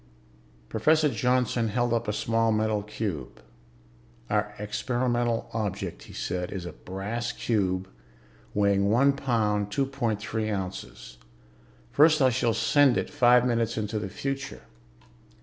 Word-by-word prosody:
Professor 155 - +3
Johnson 125 -1 +1
held 120 +2 0
up 115 0 -1
a - - +1
small 115 +1 +1
metal 110 -1 +1
cube. 100 - -5 0.9
"Our 105 0 0
experimental 120 +2 -1
object," 100 -5 -3
he - - -13
said, 90 0 -3
"is 95 -3 -5
a 90 - -5
brass 105 +6 -4
cube 95 -4 -1 0.7
weighing 100 -1 +3
one 135 +6 +4
pound, 110 -7 0
two 135 +6 +1
point 120 -6 -2
three 110 +1 -3
ounces. 95 - -6 0.7
First, 155 +2 +5
I 130 -2 +4
shall 115 -2 +1
send 145 -4 +4
it - - -2
five 125 0 +5
minutes 115 -3 0
into 110 0 -2
the 100 -2 -4
future." 135 +6 -5
110 Hz, 130 wpm, -27 LUFS, 100-125 Hz, 0.9 s, First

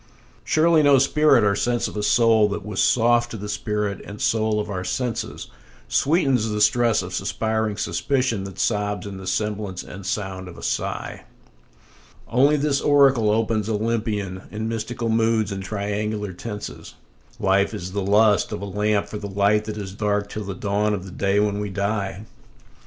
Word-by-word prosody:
Surely 160 0 +4
no 145 -2 +6
spirit 140 -2 +4
or 100 -1 +3
sense 120 +3 0
of - - -9
a 105 - -2
soul 110 0 +4
that 100 -1 -4
was 105 -2 -2
soft 120 0 +3
to 115 - -6
the 105 0 -6
spirit 105 -1 -2
and 100 +1 -9
soul 110 -1 +1
of 105 - -3
our 95 -3 -4
senses 120 +4 -3 0.4
Sweetens 135 -7 +2
the 105 0 -2
stress 115 0 +3
of 90 +1 -7
suspiring 110 +1 -1
suspicion 130 -5 0
that 95 -1 -9
sobs 105 -3 -1
in 100 -1 -7
the 95 0 -8
semblance 105 -1 -2
and 100 +2 -10
sound 95 -2 -4
of 90 - -11
a - - -11
sigh; - - -3 1.0
Only 140 +5 +3
this 140 -1 +1
oracle 135 -6 +4
opens 110 0 0
Olympian, 105 -3 -2
in 110 +1 -4
mystical 115 +1 -3
moods 110 -2 +1
and 95 0 -4
triangular 105 0 -3
tenses 105 +3 -7 0.4
"Life 100 -1 +2
is 95 -4 -6
the 100 +1 -2
lust 105 +2 +3
of - - -4
a - - -2
lamp 105 +1 0
for 105 - -7
the 100 -1 -6
light 100 +2 +2
that 110 0 -5
is 95 -2 -6
dark 105 0 -1
till 105 0 -5
the 95 -1 -5
dawn 105 +2 0
of 95 -1 -7
the 95 - -9
day 100 +2 +1
when 105 -1 +1
we 105 0 -3
die." 100 +1 -2
105 Hz, 180 wpm, -23 LUFS, 100-115 Hz, 1.0 s, no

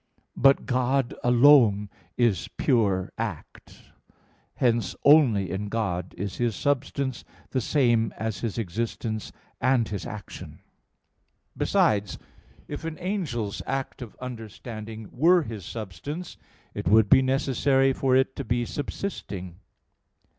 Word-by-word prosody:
But 135 +1 +4
God 130 0 +1
alone 120 -5 +6 0.3
is 120 -6 +2
pure 100 -9 +1
act. - - -7 0.6
Hence 115 -6 +1
only 125 - +5
in 100 +2 -3
God 95 -5 -2
is 100 +1 -4
His 120 -3 0
substance 140 -2 -1 0.3
the 130 - 0
same 120 -4 +2
as 110 -4 -3
His 115 +1 -3
existence 110 +1 -3 0.3
and 130 -2 +3
His 100 +1 -5
action. 105 -3 -9 1.0
Besides, 105 -1 +1 0.5
if - - -6
an 160 -1 -5
angel's 165 - -3
act 135 0 -3
of 120 -4 -8
understanding 110 -2 -8
were 170 +5 +4
his 110 - -7
substance, 115 - -6 0.4
it - - -5
would 110 0 +5
be 130 - +6
necessary 135 0 +2
for 130 -1 +1
it 130 0 +2
to 140 - -3
be 120 -1 0
subsisting. 100 - -5
120 Hz, 120 wpm, -26 LUFS, 105-135 Hz, 1.0 s, alone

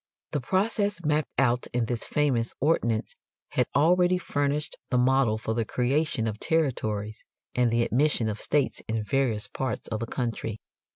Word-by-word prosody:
The 145 - -1
process 200 - 0
mapped 150 0 +1
out 125 -2 +2
in 120 -1 +1
this 120 0 -2
famous 130 -6 0
ordinance 120 -7 +1 0.3
had - - +1
already 180 +5 +4
furnished 145 -2 -1
the 125 - +2
model 125 -3 +3
for 110 0 -3
the 115 0 0
creation 125 +1 0
of 110 -1 -3
territories 110 -9 -1 0.3
and 125 -1 +3
the 115 +1 +2
admission 125 -2 +2
of 105 -1 -3
states 145 -3 +1
in 110 -1 -1
various 115 -2 +1
parts 130 -1 -3
of 110 - -2
the 115 - -3
country. 115 -3 -3
125 Hz, 160 wpm, -27 LUFS, 115-150 Hz, 0.3 s, already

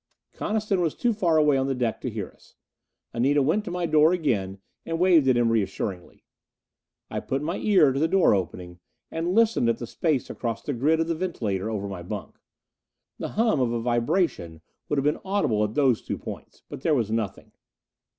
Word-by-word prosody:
Coniston 210 -3 -1
was 165 -3 0
too 240 -1 +1
far 175 -6 +2
away 150 -3 +4
on 135 0 0
the 135 - -1
deck 120 -3 -2
to 125 - -3
hear 105 -4 -5
us. - - -24 0.6
Anita 135 +4 +2
went 165 +10 +1
to - - -4
my 175 0 -2
door 155 +1 +4
again 105 - -1 0.3
and 165 0 -3
waved 175 -6 +5
at 130 -2 +4
him 120 -1 +3
reassuringly. 100 -4 -3 0.9
I - - -2
put 135 +2 -3
my 170 +4 -2
ear 185 -10 +4
to 135 - -2
the 160 - +3
door 190 - +4
opening, 90 -2 -4 0.3
and 170 +3 -2
listened 225 - +3
at 115 - +1
the 120 - -6
space 145 +3 -1
across 115 -1 -4
the 145 - -2
grid 150 +6 +2
of 165 - -1
the 170 - 0
ventilator 110 - -2
over 100 -2 -3
my 95 -3 -6
bunk. 100 +3 -7 0.8
The - - -4
hum 220 - +3
of 125 -3 +1
a 120 - -1
vibration 120 - -1 0.3
would 150 - 0
have 135 - +1
been 150 - +1
audible 190 - +1
at 105 +1 -3
those 135 -6 +3
two - - -4
points. - - -10
But - - -8
there 155 0 +2
was 115 -5 0
nothing. 110 -3 -3
135 Hz, 200 wpm, -25 LUFS, 110-170 Hz, 0.9 s, waved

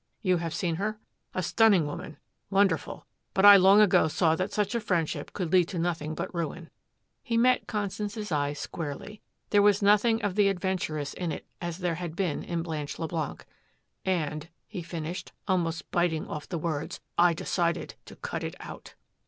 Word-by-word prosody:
You 185 -3 +3
have 165 -1 -3
seen 170 -3 -1
her? 210 +3 -2 0.4
A 185 - 0
stunning 200 -3 +4
woman 145 +1 -6 0.3
wonderful. 195 0 +1 0.3
But 195 0 +4
I 205 0 +12
long 195 +2 +7
ago 200 -5 +5
saw 160 +1 +2
that 185 +4 -2
such 205 +1 0
a 235 - +1
friendship 170 -7 -1
could 180 -4 -3
lead 180 -2 +5
to 180 - -5
nothing 165 -2 -2
but - - -4
ruin." 170 0 -4 0.5
He 230 -3 -1
met 250 +2 +3
Constance's 210 0 -3
eye 145 -1 +1
squarely. 155 +7 -6 0.3
There 205 - +5
was 205 0 +4
nothing 210 +3 +4
of 205 - 0
the 205 0 +4
adventuress 175 -6 -2
in 175 -3 -3
it - - -6 0.2
as 175 -1 -3
there 175 -2 -1
had 170 -2 -5
been 175 -5 -1
in 170 -1 -2
Blanche 155 -3 -4
Leblanc. 160 -2 -4 0.6
"And," 155 -4 -1 0.2
he 195 -5 -6
finished, 170 +1 -6
almost 170 -4 -1
biting 175 -3 +1
off 150 - -6
the 170 - -2
words, 155 -2 -3 0.2
"I 175 -1 +5
decided 170 +1 -1
to - - -12
cut - - -5
it - - -4
out." - - -10
175 Hz, 175 wpm, -28 LUFS, 160-200 Hz, 0.6 s, I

